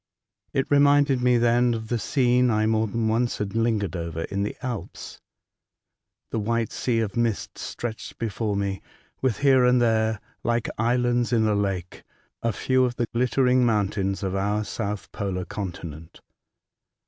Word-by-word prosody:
It 135 - 0
reminded 145 -2 +4
me 125 0 +4
then 120 0 +3
of 110 -1 -6
the 120 - 0
scene 125 -1 +2
I 110 -1 +2
more 110 0 +2
than 115 +1 -1
once 115 +2 +1
had 100 -2 -3
lingered 110 -6 0
over 85 -1 -4
in 100 +3 -3
the 100 - -3
Alps. 120 -5 -6 1.1
The 115 - -1
white 115 +1 -1
sea 115 -3 0
of 105 -3 -3
mist 115 -3 -1
stretched 115 -2 -6
before 110 -2 -2
me, 100 -1 -2 0.4
with 130 -5 +1
here 135 -2 +5
and 125 0 +4
there, 110 -2 +2 0.2
like 120 -1 0
islands 120 +1 +1
in 115 -2 +3
a 105 - +2
lake, 95 -3 -2 0.4
a 115 - +1
few 130 +5 +1
of 125 -1 0
the 120 - 0
glittering 125 +1 +3
mountains 100 -3 0
of 95 -1 -1
our 100 +2 0
South 105 -1 -4
Polar 95 -2 -3
continent. 85 -5 -7
115 Hz, 160 wpm, -25 LUFS, 100-120 Hz, 1.1 s, here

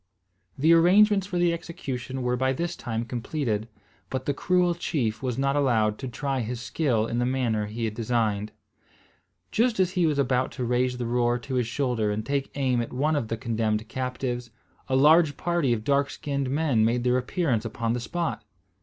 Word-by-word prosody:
The 160 +5 +5
arrangements 195 +4 +5
for 180 - -3
the 175 -1 +3
execution 135 -6 -5
were 125 0 +1
by 130 +1 +1
this 170 +5 -3
time 115 -1 -3
completed; 120 -2 -2 0.4
but 130 0 -3
the 145 - +1
cruel 180 +3 +2
chief 135 -10 -2
was 125 -3 -2
not 135 +1 +1
allowed 110 -7 +2
to 130 - -5
try 135 +2 -2
his 120 +1 -3
skill 120 -3 0
in 115 +1 -2
the 120 - +1
manner 120 -5 0
he 115 +2 -3
had 110 - -2
designed. 110 -2 -1 1.0
Just 230 -2 +1
as 185 -1 +3
he 180 -3 +2
was 150 -2 0
about 130 -2 +1
to 130 - -4
raise 125 +1 +1
the 125 - -3
roer 120 0 +1
to 125 +2 -7
his 125 -3 +1
shoulder 120 -4 0
and 105 +1 -2
take 140 -1 -1
aim 130 -4 +1
at 115 - -5
one 150 +5 +1
of 140 -6 -1
the 115 - -3
condemned 110 -1 -1
captives, 125 -1 -3 0.4
a 130 - +2
large 150 +1 +5
party 170 -7 0
of 110 -2 0
dark 140 +2 +2
skinned 140 -2 -3
men 140 -5 +2
made 120 +2 +1
their 125 0 +3
appearance 125 -3 0
upon 115 0 -2
the 125 - -1
spot. 165 -1 -3
125 Hz, 195 wpm, -26 LUFS, 115-145 Hz, 1.0 s, The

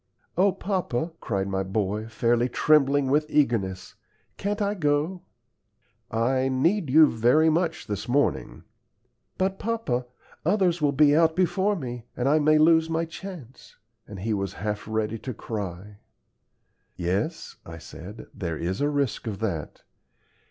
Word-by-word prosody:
"O 190 +3 +4
papa," 175 -7 -2
cried 100 -4 -2
my 95 -1 -1
boy, 100 +2 -2
fairly 120 +2 +1
trembling 145 0 +3
with 150 +3 +1
eagerness, 110 -11 0 0.4
"can't 205 +1 -2
I 205 0 0
go?" 155 +1 0 0.9
"I 130 +4 +1
need 160 +6 +1
you 155 +4 +8
very 140 +6 +3
much 165 0 -1
this 105 +1 -4
morning." 145 +3 0 0.7
"But, 190 +1 -1
papa, 205 - -2 0.4
others 180 -1 +2
will 145 -1 +3
be 145 +1 +4
out 160 0 +4
before 190 +3 +1
me, 120 - -6
and 125 - 0
I 150 +3 +4
may 155 +1 +4
lose 160 +1 +4
my 165 +1 0
chance;" 165 - -10 0.3
and 105 -3 -8
he 110 +2 -1
was 100 -2 -2
half 105 +1 -4
ready 110 0 -2
to 130 0 -6
cry. 100 -2 -6 1.0
"Yes," 100 - -2
I 80 -1 -9
said; 80 +6 -10
"there 85 -4 -4
is 90 - -3
a 145 - +2
risk 140 -5 -1
of 105 -3 -3
that. 90 -9 -4
135 Hz, 145 wpm, -26 LUFS, 105-160 Hz, 1.0 s, you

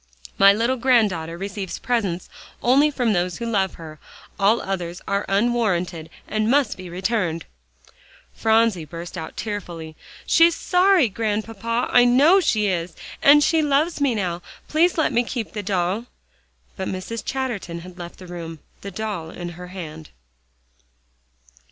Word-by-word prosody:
"My 195 0 +8
little 235 +5 +1
granddaughter 210 -10 +2
receives 195 0 -5
presents 200 -8 -1 0.4
only 275 +5 +5
from 245 -6 0
those 180 0 -1
who 235 - -5
love 200 -5 0
her. 155 -3 -10 0.4
All 205 +4 +4
others 180 -2 -4
are 200 +1 -1
unwarranted, 195 -7 0 0.2
and 215 0 0
must 280 +1 +2
be 185 -1 -9
returned." 180 -2 -1 0.9
Phronsie 220 -5 +2
burst 170 +4 -8
out 160 -2 -7
tearfully, 175 -7 -5 0.3
"She's 335 0 +5
sorry, 365 -5 +3
Grandpapa, 225 +2 -2
I 245 - +6
know 285 +10 +6
she 220 - +1
is, 175 -3 -2 0.3
and 295 +1 +7
she 320 +1 +3
loves 295 +2 +1
me 270 -5 +2
now. 180 -4 -2 0.3
Please 340 +3 +2
let 315 - +1
me 240 - +3
keep 235 -2 -5
the 210 - -3
doll." 195 +3 -1 0.7
But 190 - -4
Mrs. 190 +5 -5
Chatterton 225 -11 -3
had 180 +1 -12
left 175 0 -8
the 185 - -11
room, 170 -2 -7 0.2
the 200 - -6
doll 195 -4 -4
in 175 +1 -6
her 180 +1 -9
hand. 160 -4 -8
205 Hz, 145 wpm, -22 LUFS, 175-240 Hz, 0.9 s, My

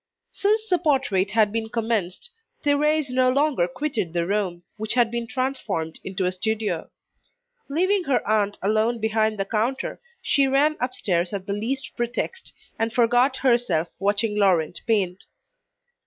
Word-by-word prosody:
Since 430 +2 +1
the 360 -3 +2
portrait 265 - +1
had 215 0 +3
been 220 0 -3
commenced, 225 - -2 0.3
Thérèse 295 0 +2
no 255 0 +3
longer 275 - +2
quitted 210 - -3
the 170 -1 0
room, 185 -3 -1
which 220 +2 -1
had 240 -2 +3
been 235 -1 -3
transformed 230 -12 -2
into 190 0 -2
a 180 - +1
studio. 220 +3 -2 0.8
Leaving 370 +5 +1
her 270 - 0
aunt 205 -1 +1
alone 220 +4 +2
behind 220 0 +1
the 195 - -1
counter, 230 +6 -2 0.2
she 280 -2 +2
ran 285 +3 +3
upstairs 190 -9 0
at 195 -2 -4
the 200 - -2
least 230 +4 -3
pretext, 245 - -3 0.3
and 225 0 0
forgot 245 +3 +3
herself 235 -12 +2
watching 205 +2 +1
Laurent 180 -6 +2
paint. 195 -5 0
225 Hz, 145 wpm, -24 LUFS, 200-265 Hz, 0.8 s, had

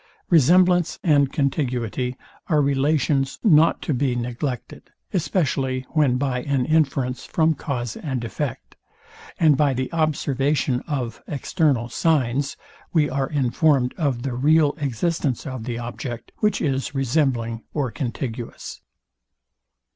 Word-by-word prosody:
Resemblance 175 +2 +4
and 145 -5 +3
contiguity 125 -3 -1 0.3
are 155 -4 +3
relations 140 0 +1
not 165 -6 +4
to 155 - -1
be 130 -1 0
neglected; 125 +1 -4 0.2
especially 135 -8 0
when 145 -6 +2
by 130 -2 -1
an 135 -1 0
inference 135 -4 +1
from 160 -1 +2
cause 125 -5 -4
and 130 -6 -4
effect, 130 +3 -5 0.6
and 155 -3 +5
by 140 -1 +2
the 130 +5 -3
observation 145 -4 +1
of 125 -7 -3
external 140 -3 0
signs, 140 -2 0 0.3
we 150 -4 +2
are 135 0 -1
informed 135 -1 +2
of 135 -8 -1
the 135 -2 -2
real 150 +3 +3
existence 145 0 -1
of 130 -5 -5
the 120 -1 -3
object, 120 0 -6
which 210 0 +1
is 135 -1 -1
resembling 125 -4 0
or 140 -6 -2
contiguous. 120 -3 -5
135 Hz, 120 wpm, -23 LUFS, 125-155 Hz, 0.6 s, and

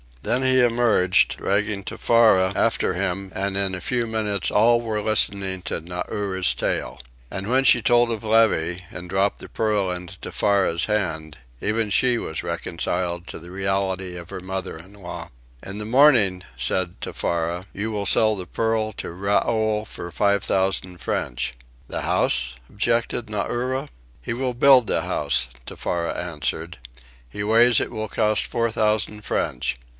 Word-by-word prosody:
Then 130 - +1
he 130 0 +5
emerged, 115 -6 +3
dragging 100 0 0
Tefara 100 -5 +3
after 115 -4 +1
him, 95 +1 -2
and 95 0 -1
in 100 -1 +1
a 90 - -4
few 120 +5 -1
minutes 105 -4 -1
all 115 +3 +5
were 110 -2 -2
listening 100 -3 0
to - - -3
Nauri's 95 +2 -1
tale. - - -2 0.3
And 95 +1 -5
when 130 +3 +3
she 125 -2 +5
told 120 +1 +3
of 110 -2 -4
Levy, 100 -6 +2
and 90 0 -8
dropped 95 +2 +1
the - - -9
pearl 105 -4 0
into 90 -1 -6
Tefara's 95 -5 +1
hand, 80 -9 -2 0.2
even 110 0 0
she 120 +4 +3
was 80 - -4
reconciled 85 +1 -2
to - - -7
the 85 +2 -12
reality 95 -1 -2
of 85 -1 -9
her - - -6
mother 95 -1 -5
in 95 +5 -13
law. 95 -4 -8 0.3
"In 100 +2 -7
the 105 - -4
morning," 115 -7 +4
said 85 +8 -1
Tefara, 85 +2 -2
"you 105 +3 -3
will 105 -2 -3
sell 110 -1 +3
the 90 -2 -7
pearl 110 0 -1
to - - -6
Raoul 105 +3 0
for 85 -4 -8
five 100 +3 +1
thousand 95 -1 0
French." - - -2 0.3
"The - - -3
house?" - - +2
objected 115 +2 0
Nauri. 125 +6 -2 0.3
"He 65 - -3
will 125 +1 -2
build 130 -1 +6
the - - +1
house," 70 -3 0 0.2
Tefara 85 -1 -3
answered. 80 -1 -3 0.5
"He 100 +12 -5
ways 115 +2 +5
it - - -3
will 110 -2 -3
cost 105 +1 +1
four 115 0 0
thousand 105 -1 0
French. 60 0 -1
100 Hz, 155 wpm, -23 LUFS, 90-110 Hz, 0.5 s, build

